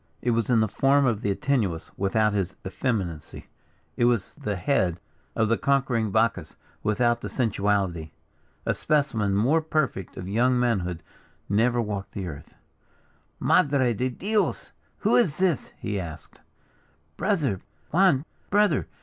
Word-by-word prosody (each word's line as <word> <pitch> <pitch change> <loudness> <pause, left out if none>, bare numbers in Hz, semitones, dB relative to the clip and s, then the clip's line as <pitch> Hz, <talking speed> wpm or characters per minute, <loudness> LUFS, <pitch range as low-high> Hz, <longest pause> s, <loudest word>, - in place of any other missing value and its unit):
It 120 - 0
was 115 -1 +1
the 115 -3 +3
form 135 +6 +3
of 115 -4 +1
the 100 - -1
Antinuous, 100 -6 -1
without 105 +2 +1
his 95 -2 -1
effeminacy 95 - -3 0.5
it 120 - +2
was 120 -5 +1
the 105 -1 -4
head 90 -3 0 0.4
of 110 - +2
the 115 +1 +1
conquering 130 -5 +1
Bacchus, 115 +3 0 0.3
without 120 +2 +1
the - - -5
sensuality. 100 -8 0 0.6
A - - +1
specimen 120 -10 0
more 135 +11 +3
perfect 155 - -2
of 90 - -6
young 125 +5 +2
manhood 90 -9 0 0.4
never 115 +4 +2
walked 105 -3 -3
the 95 - -4
earth. 70 -4 -9 0.8
"Madre 135 -4 +3
de 125 +4 -1
Dios, 205 - -1 0.3
who - - +3
is 205 - +3
this?" 180 -6 0
he 105 -2 -3
asked. 80 -3 -9 0.7
"Brother! 155 - 0 0.3
Juan! 165 -5 +4 0.2
brother!" 205 -7 +2
115 Hz, 135 wpm, -26 LUFS, 100-135 Hz, 0.8 s, Juan